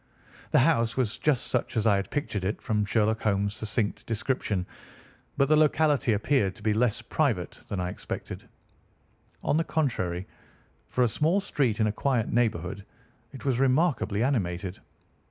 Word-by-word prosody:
The - - +3
house 120 -5 +2
was 125 -5 0
just 145 -5 +1
such 130 - -1
as 110 - +1
I 105 -3 +5
had 100 -1 -3
pictured 145 -10 -2
it 100 +3 -1
from 105 -2 0
Sherlock 110 +1 +1
Holmes' 100 -1 +1
succinct 110 -1 -2
description, 110 -4 -1 0.7
but 140 - +3
the 155 - +5
locality 150 -4 +3
appeared 105 -2 +1
to 110 - -15
be 110 0 +2
less 115 +1 +1
private 115 - -1
than 100 - -3
I 90 0 -1
expected. - - -7 0.9
On 150 - +2
the 165 - +2
contrary, 95 - -1 0.6
for 125 - +2
a - - +4
small 155 - +2
street 135 - 0
in 110 - +3
a 105 - +1
quiet 120 0 0
neighbourhood, 105 -5 0 0.5
it 135 0 -10
was 130 -3 +1
remarkably 130 - +2
animated. 95 -8 -1
115 Hz, 160 wpm, -27 LUFS, 100-135 Hz, 0.9 s, I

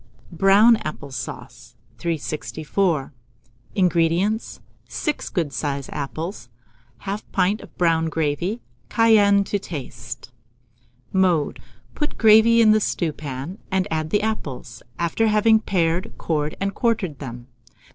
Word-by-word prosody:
BROWN 195 +7 +6
APPLE 145 -5 -7
SAUCE. - - -8 0.2
364. 155 +1 -2 0.6
INGREDIENTS. 180 +3 +1 0.3
6 300 -2 -3
good 165 -7 -2
sized 140 +1 -3
apples, 150 - -5 0.5
1/2 200 +2 -3
pint 195 +3 +1
of - - -15
brown 165 -2 +2
gravy, 160 +8 -1 0.3
cayenne 205 -3 +5
to 200 +1 -2
taste. 130 - -8 0.8
Mode. 180 -6 +2 0.3
Put 295 - -2
the - - -15
gravy 225 +1 +6
in 215 -1 +6
a 215 - +4
stewpan, 155 -2 -3
and 190 0 0
add 155 -1 -1
the 205 +3 +1
apples, 215 -12 -4 0.2
after 170 +7 +1
having 220 +1 +4
pared, 180 -1 0
cored, 150 -2 -1
and 195 0 -1
quartered 205 - -1
them. 120 -3 -7
175 Hz, 115 wpm, -22 LUFS, 150-210 Hz, 0.8 s, BROWN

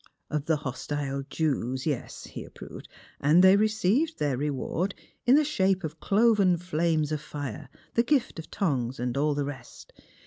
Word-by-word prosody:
'' - - -50
Of 150 -1 -1
the 160 - +2
hostile 140 0 -3
Jews; 130 -4 -1
yes," 145 -6 -3
he - - -8
approved, - - -11 0.2
'' - - -28
and 155 +6 +5
they 190 +1 +8
received 215 - +2
their 145 -3 0
reward 150 +7 -2 0.3
in 255 - +7
the 305 - +5
shape 195 -9 +1
of 160 0 -5
cloven 200 -1 +3
flames 165 -3 0
of 155 -2 -2
fire, 145 -1 -6 0.2
the 235 - +4
gift 245 - 0
of 160 - -9
tongues, 130 - -1
and 125 0 -2
all 145 +1 +1
the 145 -1 -1
rest. 135 -4 -9
155 Hz, 175 wpm, -27 LUFS, 140-195 Hz, 0.3 s, they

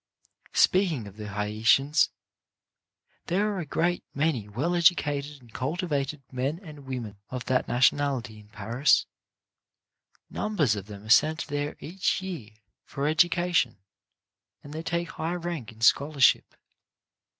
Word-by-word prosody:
Speaking 175 - +3
of 100 -1 -11
the 105 -1 -6
Haitians, 110 +8 +2 1.2
there 205 +4 +1
are 195 - -3
a 165 - -5
good 175 +4 0
many 140 -8 0
well 140 - -1
educated 150 -4 +2
and 120 -3 -19
cultivated 145 -1 -2
men 135 +5 -2
and 150 -7 -12
women 120 -6 -5
of 125 -1 -5
that 130 0 +1
nationality 125 -2 +1
in 105 - -16
Paris. 110 +6 +2 1.2
Numbers 160 - 0
of 100 -1 -7
them 100 -1 -10
are 110 - -11
sent 155 +7 +4
there 145 0 -3
each 180 +4 -1
year 180 - -6 0.3
for 140 -1 -4
education, 175 - +2 0.9
and 145 - -10
they 160 - -4
take 170 +1 -2
high 165 +2 -3
rank 170 -9 -5
in 110 0 -18
scholarship. 140 +2 +4
145 Hz, 130 wpm, -27 LUFS, 120-170 Hz, 1.2 s, sent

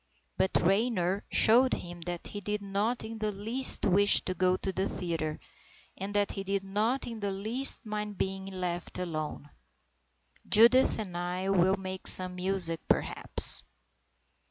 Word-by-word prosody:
But 190 - 0
Raynor 195 -1 0
showed 245 +3 +4
him 175 -1 -9
that 175 -1 -6
he 205 - -8
did 210 +1 -4
not 205 +5 -2
in 225 0 -8
the 215 -1 -1
least 225 +7 +4
wish 200 +2 +5
to 185 - -3
go 185 +1 0
to 190 - -5
the 190 +1 -2
theatre 165 -3 -4 0.6
and 195 +2 -6
that 205 -1 0
he 195 - -6
did 195 0 -3
not 215 +7 -2
in 230 -2 -7
the 205 -1 -3
least 220 +8 -1
mind 210 -1 -5
being 190 0 -3
left 180 -2 -5
alone. 155 -4 -6 1.0
"Judith 235 +4 +5
and 190 -5 -6
I 180 +2 -4
will 190 +1 +2
make 190 -1 -6
some 185 0 +3
music, 180 -3 +2
perhaps." - - +2
195 Hz, 155 wpm, -28 LUFS, 180-210 Hz, 1.0 s, wish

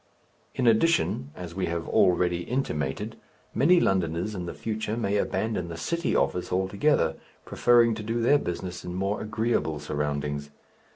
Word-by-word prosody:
In 130 - 0
addition, 115 - +2
as 90 -2 -7
we 95 +1 -2
have 85 -1 -3
already 90 -1 +3
intimated, 75 - -3 0.4
many 170 +9 +5
Londoners 90 - 0
in 90 -3 -5
the - - -5
future 110 0 -3
may 105 -3 0
abandon 105 -3 -1
the 85 -1 -7
city 170 - -1
office 90 - 0
altogether, 95 - +1 0.3
preferring 120 -1 +4
to 110 - -5
do 115 +2 -2
their 135 +5 +4
business 90 -2 -5
in 90 0 -6
more 100 +2 -1
agreeable 110 -7 -1
surroundings. 75 -1 -3
95 Hz, 150 wpm, -27 LUFS, 85-115 Hz, 0.4 s, many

